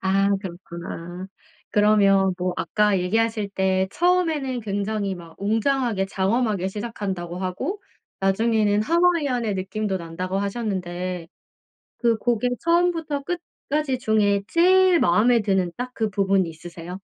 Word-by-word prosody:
아 195 +1 +2
그렇구나. 175 -1 -7 0.4
그러면 200 -2 +4
뭐 180 0 -1
아까 210 -2 +1
얘기하실 220 +2 0
때 190 -1 +1
처음에는 325 -8 +1
굉장히 200 -1 -2
막 170 -2 -12
웅장하게 225 -1 0
장엄하게 195 0 0
시작한다고 195 -5 -5
하고 255 - -3 0.4
나중에는 210 +1 +2
하와이안의 290 - +1
느낌도 195 +1 -2
난다고 180 +3 -4
하셨는데 185 -5 -3 0.7
그 235 -2 +2
곡의 245 +2 0
처음부터 335 -4 +1
끝까지 300 -4 -3
중에 210 -3 +2
제일 370 +1 +5
마음에 225 +7 +4
드는 190 -3 +1
딱 250 +1 -5
그 220 -1 0
부분이 195 -3 +1
있으세요? 165 +1 -10
205 Hz, 305 characters per minute, -23 LUFS, 190-245 Hz, 0.7 s, 제일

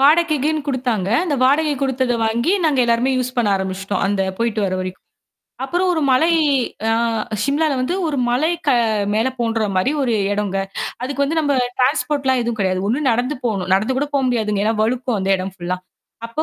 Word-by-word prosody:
வாடகைக்குன்னு 310 0 +3
குடுத்தாங்க. 245 -8 -1 0.2
அந்த 320 -5 -1
வாடகை 295 +3 +3
குடுத்த 260 -2 0
வாங்கி, 235 +10 +1
நாங்க 300 -4 +2
எல்லாருமே 235 +2 +2
யூஸ் 255 0 -2
பண்ண 235 -3 +2
ஆரம்பிச்சுட்டோம். 190 0 -3
அந்த 195 0 0 0.2
போயிட்டு 230 -2 0
வர 185 - -2
வரைக்கும். 185 0 -6 0.6
அப்புறம் 355 +6 0
ஒரு 325 - 0
மலை 260 +6 +4 0.6
ஆ - - +3 0.5
சிம்லால 295 +4 +1
வந்து 255 +8 -1
ஒரு 305 -3 -2
மலை 255 +6 +1 0.2
க - - +4 0.4
மேல 225 +4 +2
தோன்ற 225 -2 0
மாரி 185 +8 +2
ஒரு 240 -4 +1 0.2
எடங்க. 205 -1 -2 0.5
அதுக்கு 275 +2 -2
வந்து 320 +4 -1
நம்ம 290 -2 +1 0.3
ட்ரான்ஸ்போர்ட்லாம் 265 0 +1
எதுவும் 235 -1 -3
கிடையாது. 185 -1 0
ஒண்ணு 270 +5 +1
நடந்து 245 +5 0
போணும். 195 -6 -1
நடந்து 215 +7 0
கூட 290 - 0
போ 280 - +3
முடியாதுங்க. 210 -4 0
ஏன்னா, 220 +1 +1
வழுக்கும்ம் 245 0 0
அந்த 190 +1 -1
இடம் 185 0 -5
ஃபுல்லா. 180 +1 -3 0.5
அப்போ 270 +7 -2
245 Hz, 175 wpm, -19 LUFS, 210-280 Hz, 0.6 s, மலை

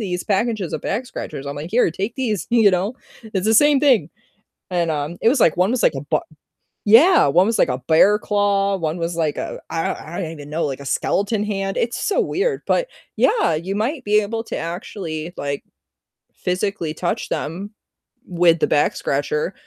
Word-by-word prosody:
these 180 -4 -3
packages 210 -3 -1
of - - -3
back 240 +5 -2
scratchers. 140 - -7
I'm 140 0 -5
like, 155 +4 -6
"Here, 230 -6 +3
take 200 +8 -4
these," 220 - -2
you 225 -4 +5
know, 185 +6 -1 0.3
it's 210 -3 -3
the 220 - +3
same 290 +3 +5
thing, 240 - +3 0.6
and, 170 -2 0
um, 150 +2 -3
it 225 - +4
was, 270 - +3
like 165 - +4
one 185 +4 +2
was 250 - 0
like - - +4
a 135 - -4
b - - +3 0.7
Yeah, 305 - +7
one 180 +8 +4
was 225 - 0
like - - +4
a 125 0 -2
bear 195 +6 +5
claw, 200 -1 +1
one 160 -1 -2
was 165 0 -2
like, 155 -3 -1
uh, - - -4
I 165 -1 -1 0.2
I - - -2
don't 165 - -4
even 145 -2 -10
know, 165 +2 -1
like 135 -2 -4
a 140 - -10
skeleton 205 +8 0
hand, 195 -2 -3
it's 235 0 -1
so 410 - +1
weird, 415 +3 -1
but - - +2 0.3
yeah, 425 - +2
you 185 +5 -3
might 255 +7 -2
be 210 0 +3
able 225 +2 -3
to - - -5
actually, 170 -1 -5
like, 140 0 -3 0.7
physically 180 -3 -2
touch 175 +2 -3
them 190 +7 -4 0.6
with 170 -2 +3
the - - +2
back 145 - +2
scratcher, 150 +5 -1
195 Hz, 200 wpm, -21 LUFS, 165-220 Hz, 0.7 s, Yeah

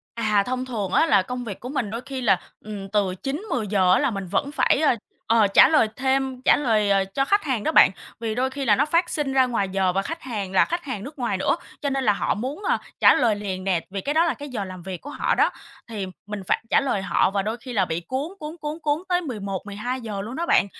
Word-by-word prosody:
À, 215 -3 +2
thông 255 0 -2
thường 215 -7 -4
á - - +4
là 200 -11 +4
công 250 +5 -5
việc 205 -5 -7
của 250 - -7
mình 255 -6 -2
đôi 230 +2 -4
khi 270 -1 -4
là, 200 -7 +3 0.2
ừm, 205 -2 -7
từ 195 -2 0
9:00-10:00 220 - 0
á - - +5
là 280 -2 +1
mình 195 -3 -4
vẫn 280 +10 0
phải, 285 -1 +2
ơ, 305 -5 +4 0.3
ờ, 225 -2 +4
trả 195 - +7
lời 300 -8 +4
thêm 265 -1 0
trả - - +6
lời, 220 -7 +1
ờ, 195 -1 +3
cho 195 +8 -1
khách 405 +7 +2
hàng 255 -8 -1
đó 315 - +1
bạn. - - +7 0.3
Vì 225 -2 -2
đôi 255 +3 0
khi 275 +1 -4
là 210 -5 +4
nó 285 - +3
phát 335 +3 +1
sinh 290 -3 -1
ra 260 -1 +4
ngoài 230 -6 -1
giờ 190 -1 +1
và 195 +2 0
khách 330 +10 -6
hàng 210 -7 -4
là 190 - +5
khách 345 +1 -3
hàng 225 -7 -5
nước 290 +3 -10
ngoài 240 -6 -1
nữa, 190 - +1 0.2
cho 285 - -1
nên 270 -1 -1
là 210 - +5
họ - - 0
muốn, 265 - -5
ờ, - - +2 0.2
trả - - +7
lời 230 -5 +2
liền 190 -2 -4
nè, 185 -3 +1
vì 195 0 -3
cái 285 +8 -2
đó 325 +2 +4
là 335 - +1
cái 290 - -8
giờ 225 -7 -3
làm 185 -2 -9
việc 185 -1 -6
của 290 - -9
họ - - 0
đó, - - +3 0.4
thì 210 -4 -4 0.2
mình 210 -1 -5
phải - - +1
trả - - +5
lời 250 -8 -1
họ 195 - +2
và 195 0 0
đôi 215 +3 -2
khi 250 +1 -9
là 200 -5 +2
bị 165 -1 -3
cuốn, 260 - -4
cuốn, 305 +2 -6
cuốn, 300 +1 -4
cuốn 300 +2 0
tới 355 -1 +2
11:00-12:00 210 - -4
luôn 230 +5 -6
đó 340 - -2
bạn. - - +4
230 Hz, 270 wpm, -24 LUFS, 200-275 Hz, 0.4 s, trả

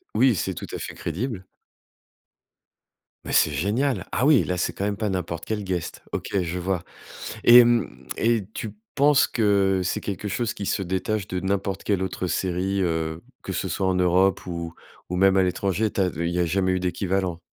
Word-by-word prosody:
Oui, 130 -4 +4
c'est 95 +1 -2
tout - - -7
à - - -4
fait - - -6
crédible. 95 - -4 1.8
Mais - - -5
c'est 75 - +4
génial! 115 - 0
Ah, 125 - +1
oui, 145 -4 +6
là, 90 - -2
c'est 90 - -1
quand - - -4
même 100 0 -1
pas 110 0 -1
n'importe 85 -3 -3
quel 105 -2 -2
guest. 90 -3 -4
OK, - - -3
je 90 +1 -3
vois 90 -1 -1 0.6
et 120 0 +10
mmh, 105 - 0
et 115 -3 +2
tu 110 -2 -6 0.2
penses 145 0 +5
que 100 -4 +2
c'est 90 - -1
quelque 100 +1 -4
chose 115 +2 -1
qui 100 - -6
se 100 - 0
détache 95 +3 -2
de 90 - -2
n'importe 95 0 -2
quelle 100 -3 +1
autre 95 -1 -3
série, 95 +2 -1
heu, 80 -2 -1 0.2
que 95 - -4
ce 95 - -2
soit 95 +3 -1
en 95 - +1
Europe 90 +1 +2
ou 85 -1 -5 0.3
ou 90 - -2
même 95 0 +4
à 95 - +5
l'étranger? 95 +3 0
Tu 100 - -1
as 95 - +3
il 85 +2 -1
y 90 - -1
a 90 - +3
jamais 95 +2 +1
eu 95 - 0
d'équivalent? 90 -1 -1
95 Hz, 200 wpm, -24 LUFS, 90-105 Hz, 1.8 s, et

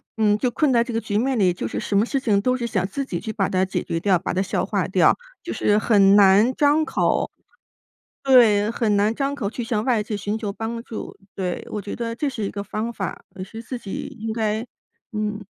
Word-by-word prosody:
嗯， 210 -2 +3
就 250 +2 0
困 280 +3 +1
在 235 -1 +4
这 235 -1 -3
个 225 - 0
局 205 -1 -2
面 260 +2 +1
里， 185 -4 +4
就 - - -4
是 - - -5
什 200 - 0
么 210 - +4
事 275 - -1
情 215 -6 +2
都 255 +3 +1
是 240 -2 -3
想 190 -5 -1
自 275 +8 -3
己 175 -9 -4
去 220 - -5
把 195 -4 0
它 185 0 +1
解 185 - -3
决 165 - -2
掉、 190 0 +3
把 185 - -4
它 185 - +1
消 195 - -1
化 - - -1
掉， - - +4 0.3
就 - - -5
是 205 0 +2
很 200 -3 +5
难 205 +5 +6
张 295 +2 +3
口 - - 0 0.9
对， 225 -5 +5
很 220 -3 +1
难 210 +2 +2
张 275 +2 -2
口 205 -7 -2
去 240 - -4
向 220 -2 -1
外 240 -5 +2
界 210 0 -4
寻 205 +2 -3
求 215 -3 -3
帮 225 +2 -4
助。 225 - -7 0.2
对， 180 -2 -3
我 210 - -4
觉 200 - -6
得 230 -1 -4
这 290 - -1
是 245 -6 -3
一 195 - -1
个 200 -1 -5
方 220 +3 -3
法， 195 -5 -5
也 185 - -6
是 225 +4 -9
自 250 +2 -6
己 200 -4 -6
应 220 0 -3
该 220 +1 -1 0.5
嗯。 210 -1 -3
215 Hz, 260 characters per minute, -23 LUFS, 200-235 Hz, 0.9 s, 难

